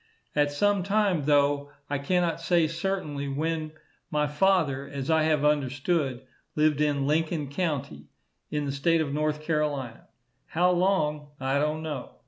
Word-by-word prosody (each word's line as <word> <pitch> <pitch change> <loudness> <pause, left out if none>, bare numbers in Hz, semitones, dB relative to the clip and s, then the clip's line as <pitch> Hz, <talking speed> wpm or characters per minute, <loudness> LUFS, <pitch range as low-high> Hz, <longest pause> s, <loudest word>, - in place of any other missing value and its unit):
At 145 -1 +2
some 200 +7 +2
time, 195 -5 +1
though 145 -1 +2 0.2
I 145 -1 -2
cannot 170 +2 0
say 170 -1 +3
certainly 165 -4 -3
when, 155 +2 -2 0.4
my 150 0 +1
father, 150 -3 +1
as 140 +2 -3
I 160 0 +4
have 150 -2 +2
understood, 140 -1 0 0.3
lived 150 -1 +2
in 145 -2 +1
Lincoln 155 0 0
county, 140 - -3 0.4
in 150 -1 -2
the 140 - -2
state 160 +4 +2
of 145 -3 -2
North 150 0 -1
Carolina. 145 -7 -2 0.4
How 180 +2 +2
long, 175 -5 +1
I 135 +1 0
don't 150 +2 -1
know. 150 -5 -5
150 Hz, 145 wpm, -27 LUFS, 140-165 Hz, 0.4 s, I